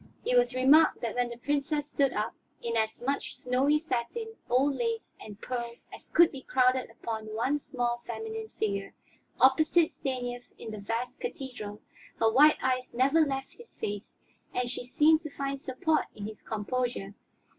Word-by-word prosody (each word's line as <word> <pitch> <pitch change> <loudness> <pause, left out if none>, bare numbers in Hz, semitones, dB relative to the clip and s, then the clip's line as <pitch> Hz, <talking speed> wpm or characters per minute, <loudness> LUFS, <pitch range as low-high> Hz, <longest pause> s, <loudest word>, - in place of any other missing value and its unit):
It 250 - +2
was 245 +1 +4
remarked 285 +5 +5
that 230 -2 -2
when 245 -1 0
the 235 - -7
Princess 290 +3 -1
stood 280 -2 +2
up, 210 -1 -2 0.3
in 230 -1 -3
as 220 +1 0
much 280 +2 -2
snowy 265 +4 +2
satin, 325 - -3
old 270 +4 +3
lace 460 - -2
and 210 -1 -10
pearl 235 -1 -4 0.2
as - - -7
could 340 0 +6
be 270 - -8
crowded 255 0 +2
upon 220 -1 -5
one 265 +6 +1
small 240 -3 -2
feminine 445 0 -5
figure, 200 -2 -2 0.4
opposite 310 +5 +5
Stanief 245 -2 -4
in 220 - -7
the 215 - -6
vast 235 +5 -3
cathedral, 250 - -6 0.3
her 225 -1 +3
wide 295 +6 +7
eyes 255 -1 0
never 275 +6 +4
left 270 -2 -3
his 470 - -15
face, 205 +1 -5 0.4
and 245 -1 0
she 245 - -4
seemed 305 +6 +4
to 310 - -6
find 275 -1 -4
support 290 +4 +1
in 205 - -6
his 215 0 -7
composure. 220 -1 -2
255 Hz, 165 wpm, -29 LUFS, 235-290 Hz, 0.4 s, wide